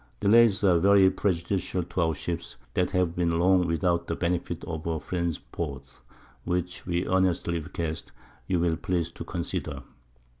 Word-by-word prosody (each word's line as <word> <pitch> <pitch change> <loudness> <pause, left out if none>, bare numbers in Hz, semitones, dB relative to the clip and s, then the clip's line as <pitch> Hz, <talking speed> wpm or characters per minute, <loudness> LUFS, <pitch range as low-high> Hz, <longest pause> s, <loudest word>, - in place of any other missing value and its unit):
_ 100 - 0
_Delays 110 -1 +5
are 90 -2 +5
very 95 +1 +6
prejudicial 90 -1 -1
to 90 +2 -2
our 80 -2 +1
Ships, 85 -3 -5 0.2
that 90 - +1
have 90 -3 0
been 85 -2 +1
long 90 +1 +4
without 85 +1 0
the 85 - -1
Benefit 85 -1 -2
of 80 -1 -5
a 80 -1 -1
Friend's 85 -1 -2
Port. 70 -5 -7 0.4
Which 90 0 -3
we 90 0 0
earnestly 90 -2 +1
request, 80 0 -5 0.4
you'll 85 -2 +1
please 85 0 -1
to - - -8
consider. - - -4
85 Hz, 155 wpm, -27 LUFS, 85-90 Hz, 0.4 s, very